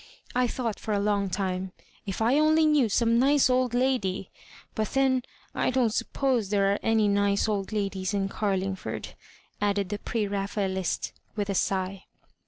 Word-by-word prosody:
I 250 0 +2
thought 235 -3 -3
for 215 - -2
a - - +1
long 200 -1 +1
time, 185 0 -2 0.3
if 195 +3 -2
I 250 +6 +4
only 310 +1 +4
knew 295 -7 +3
some 230 +2 +3
nice 275 0 +4
old 250 -1 +1
lady; 245 -8 0 0.4
but 215 -1 -1
then 265 -1 +3 0.3
t - - +1
don't 245 -4 +2
suppose 250 -7 0
there 200 -1 +2
are - - -2
any 225 -2 +2
nice 200 0 +2
old 200 -2 -2
ladies 195 -3 -2
in 200 -2 0
Carlingford," 195 -2 -2 0.5
added 200 -2 +1
the 205 0 -3
Prera 200 -4 -2
phaelist, 190 -3 -2 0.2
with 205 -1 -1
a - - 0
sigh. 190 0 -1
205 Hz, 165 wpm, -27 LUFS, 195-245 Hz, 0.5 s, I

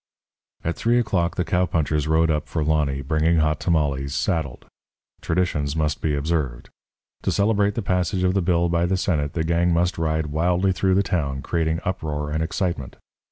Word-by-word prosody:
At 85 - -1
three 120 +1 +2
o'clock 90 -8 0
the 90 - -1
cowpunchers 80 -4 0
rode 80 +1 +3
up 75 -1 -1
for 80 +1 -2
Lonny, 75 -3 0
bringing 80 +4 +2
Hot 75 -1 +1
Tamales, 70 -5 0
saddled. 80 -11 -2 0.6
Traditions 80 -4 -1
must 75 -2 -1
be 75 -2 0
observed. 70 -4 -2 0.5
To - - 0
celebrate 105 0 +2
the 115 - -2
passage 90 0 0
of 90 0 +2
the 100 - +1
bill 85 -1 +2
by 85 0 +1
the 95 +1 +1
Senate 80 -6 -1
the 80 - -1
gang 85 +2 +1
must 85 +1 +1
ride 80 -1 0
wildly 90 +4 +2
through 95 +1 +1
the 100 - +3
town, 70 -8 -2
creating 80 0 -1
uproar 75 -5 -3
and 80 +1 -1
excitement. 80 -4 -2
80 Hz, 175 wpm, -23 LUFS, 75-90 Hz, 0.6 s, rode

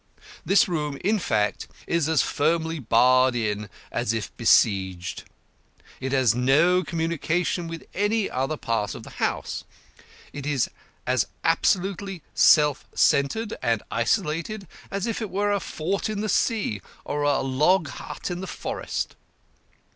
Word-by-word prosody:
This 205 +4 +4
room, 150 -5 -2
in 210 +2 +2
fact, 105 - 0 0.2
is 170 -3 0
as 160 - +3
firmly 160 +2 0
barred 130 +1 +4
in 105 -3 -2 0.2
as 120 -2 0
if 110 -3 -4
besieged. 95 -6 +2 0.7
It 130 0 -3
has 130 -5 +3
no 150 +9 +3
communication 170 +1 -1
with 165 0 -7
any 205 +1 +1
other 135 +4 -2
part 110 -6 -1
of - - -9
the - - -11
house. - - -1 0.7
It 145 0 -6
is 140 -5 0 0.3
as 130 -3 +1 0.2
absolutely 190 +1 0
self 150 -2 +5
centred 205 +11 +2
and 115 -2 0
isolated 170 - -1 0.2
as 200 0 -2
if 230 0 -2
it 215 - -3
were 205 +2 0
a 200 - +2
fort 190 +5 -2
in 210 -1 -2
the 215 - -2
sea 195 - 0 0.2
or 145 - -2
a 145 -1 +2
log 155 +6 +2
hut - - -6
in 175 +1 -4
the 190 - -5
forest. - - -4
155 Hz, 140 wpm, -25 LUFS, 130-190 Hz, 0.7 s, self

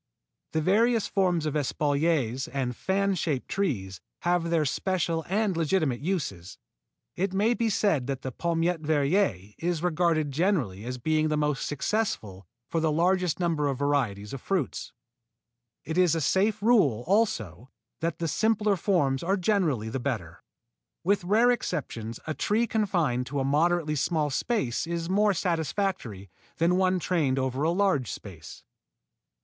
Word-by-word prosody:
The 160 - +1
various 225 +5 +3
forms 180 -5 +1
of 155 - -1
espaliers 145 -3 0
and 130 -3 -3
fan 195 +5 0
shaped 155 -7 -2
trees 105 - -2 0.2
have 175 -1 +1
their 165 -2 +2
special 165 +1 -1
and 205 -1 +1
legitimate 160 -5 +1
uses. 140 - -3 0.6
It 190 +1 -1
may 215 +5 +3
be 230 -1 0
said 200 -6 +2
here - - -8
that 135 -1 -3
the 130 - -3
Palmette 170 +3 -1
Verrier 145 - +1
is 170 -1 -1
regarded 165 -3 +1
generally 135 - 0
as 125 +1 -4
being 155 +5 +1
the 155 -1 0
most 150 -2 0
successful 130 - -2 0.2
for 165 - -1
the 160 -1 +1
largest 180 +2 +1
number 165 -4 +1
of 135 -2 -1
varieties 125 -8 -1
of 135 - -6
fruits. 185 -9 -2 0.9
It 160 +3 -2
is 180 -2 +4
a - - 0
safe 205 +7 +1
rule 175 - +3
also 130 - 0 0.3
that 165 0 -2
the 165 - -2
simpler 215 +3 +2
forms 145 -8 +1
are 190 +4 +1
generally 170 - +1
the 130 - -3
better. 110 -11 -4 0.6
With 200 +1 +2
rare 220 +7 +4
exceptions 115 - -3
a 155 - -2
tree 215 +8 +1
confined 175 - 0
to 140 +1 -2
a 135 - 0
moderately 155 +2 +2
small 150 0 0
space 140 - -1
is 170 +1 -3
more 205 0 +3
satisfactory 160 - -2 0.3
than 170 +2 +2
one 185 0 +2
trained 155 -7 0
over 130 0 -1
a 155 - +2
large 180 - +1
space. 80 -8 -10
165 Hz, 155 wpm, -27 LUFS, 135-190 Hz, 0.9 s, is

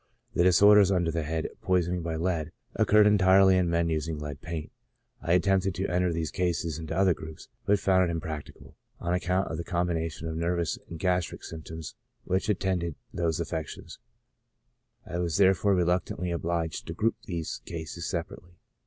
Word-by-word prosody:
The - - +2
disorders 100 +2 +7
under 85 -3 +1
the 85 0 -1
head 80 +1 -2
Poisoning 90 -1 +1
by 80 -1 -3
Lead 80 -2 -1 0.2
occurred 105 0 +5
entirely 95 -2 +6
in 90 -2 +2
men 85 0 +1
using 80 0 -2
lead 75 -1 -6
paint; 80 -2 -5 0.5
I 85 - +1
attempted 95 0 +2
to 95 - -1
enter 90 0 +1
these 80 -1 -2
cases 85 -3 -1
into 80 +1 -4
other 95 -2 +4
groups, 80 -1 -10 0.2
but 105 - +5
found 95 -2 +3
it - - -1
impracti 80 -2 -6
cable, - - -16 0.2
on 85 0 -1
account 90 +1 0
of 80 - -3
the 85 - -3
combination 85 -2 -2
of 80 - -4
nervous 85 0 -1
and 85 - -6
gas 90 +1 +1
tric - - -10
symptoms 80 0 -8 0.3
which 95 +3 -1
attended 90 -5 0 0.2
those 85 -2 0
affections; 80 -2 -5 1.1
I 85 0 -4
was 85 -1 0
therefore 95 0 +4
reluctantly 90 0 0
obliged 85 -1 -2
to 80 - -4
group 110 +1 +1
these 85 -4 -4
cases 80 0 -5
separately. 85 0 -5
85 Hz, 170 wpm, -28 LUFS, 80-95 Hz, 1.1 s, disorders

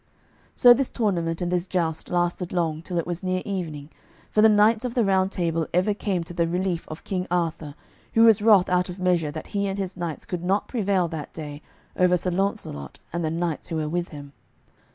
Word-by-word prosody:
So 245 -1 +8
this 260 +1 0
tournament 175 -6 -1
and 175 - -2
this 180 +1 0
joust 165 -4 -1
lasted 175 0 -1
long, 160 -3 -1
till 175 +1 -5
it 170 - 0
was 175 0 -4
near 185 0 -1
evening, 160 -7 -5 0.4
for 215 - +3
the 220 - +7
knights 215 +2 +4
of 245 -1 -3
the 240 -3 +3
Round 190 -1 +2
Table 165 -4 -1
ever 185 +4 +3
came 195 -4 -2
to 170 - -9
the 170 -1 +1
relief 180 0 -2
of 155 - -8
King 185 -2 -3
Arthur, 165 -4 -2 0.4
who 225 - +6
was 225 -2 +6
wroth 205 -4 +6
out 180 0 +1
of 180 - -6
measure 180 -4 +1
that 145 - -6
he 200 -1 0
and 195 0 -3
his 190 -2 -4
knights 170 -3 -5
could 175 -2 -4
not 195 +3 +1
prevail 200 -6 +1
that 160 -3 -6
day 150 -2 -7 0.3
over 180 0 +4
Sir 180 +1 -2
Launcelot 180 - -3 0.2
and 170 0 -2
the 160 - 0
knights 165 -1 -2
who 165 - -4
were 155 -1 -1
with 175 +2 -1
him. 145 -2 -10
180 Hz, 215 wpm, -25 LUFS, 165-195 Hz, 0.4 s, So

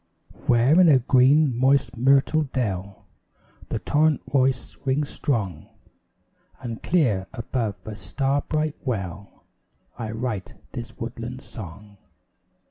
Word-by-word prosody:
Where 125 +8 +5
in 175 - +7
a 140 - +7
green, 130 +2 +4
moist, 130 +1 +2
myrtle 135 +5 +3
dell 100 -6 -3 0.6
The - - -1
torrent 155 0 +1
voice 130 -2 0
rings 140 +2 0
strong 100 - -2 0.9
And 115 -3 -6
clear, 115 - +1
above 115 -3 -2
a 110 - -6
star 135 +9 0
bright 155 0 -1
well, 100 -6 -5 0.6
I 110 -2 -3
write 110 -3 -4 0.2
this 120 -3 -7
woodland 120 +2 -6
song. 100 -1 -10
125 Hz, 115 wpm, -24 LUFS, 105-140 Hz, 0.9 s, in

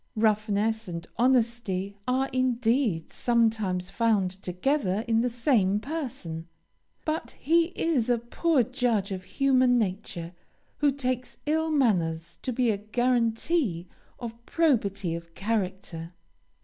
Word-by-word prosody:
Roughness 215 0 +1
and 170 -1 -5
honesty 230 -6 +1
are 260 +2 +2
indeed 240 - +1
sometimes 220 -6 +1
found 215 -6 +2
together 200 +2 0
in 225 -1 +3
the 250 - +1
same 230 -5 +2
person, 225 - -5 0.6
but 310 +1 -3
he 330 +4 +4
is 280 -9 +1
a 240 - +4
poor 255 +5 +1
judge 235 -6 0
of 185 -1 -4
human 255 -1 +3
nature 185 -5 -3 0.4
who 290 -1 +3
takes 255 -2 -3
ill 320 +2 +1
manners 170 - +1
to 255 - -2
be 245 -1 +2
a 205 - -1
guarantee 230 - 0 0.3
of 235 -1 -8
probity 205 - +1
of 170 0 -8
character. 190 -5 -3
225 Hz, 120 wpm, -27 LUFS, 190-255 Hz, 0.6 s, he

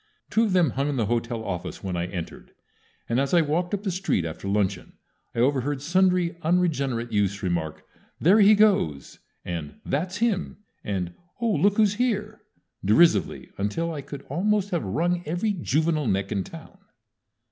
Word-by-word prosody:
Two 225 - +3
of 205 - -1
them 175 -7 +4
hung 140 +2 -1
in 145 - -1
the 115 -4 +1
hotel 115 +1 -2
office 90 -2 -5
when 95 -2 -3
I 85 0 -1
entered, 90 -2 -7 0.5
and 120 +2 +1
as 140 +5 +1
I 170 - +6
walked 165 +4 -1
up 200 - -7
the 195 - -1
street 180 - 0
after 85 +4 -6
luncheon 100 -2 -1 0.4
I - - -1
overheard 135 +2 +1
sundry 180 +2 +2
unregenerate 140 -9 0
youths 100 -1 0
remark, 85 -4 -2 0.3
"There 190 +7 +5
he 210 +1 +7
goes!" 190 - +2 0.3
and 85 -4 -5
"That's 180 +8 -2
him!" 220 -5 0 0.3
and 90 -4 -3 0.3
"Oh, 230 -1 +1
look 205 0 +2
who's 210 -2 +4
here!" 215 -3 -1 0.4
derisively, 105 - +3
until 165 +12 -1
I 145 - -5
could 140 0 -9
almost 200 +6 0
have 175 - 0
wrung 170 - 0
every 175 +7 0
juvenile 155 -3 0
neck 95 -1 0
in 100 - 0
town. 165 +3 -12
150 Hz, 170 wpm, -25 LUFS, -, 0.5 s, he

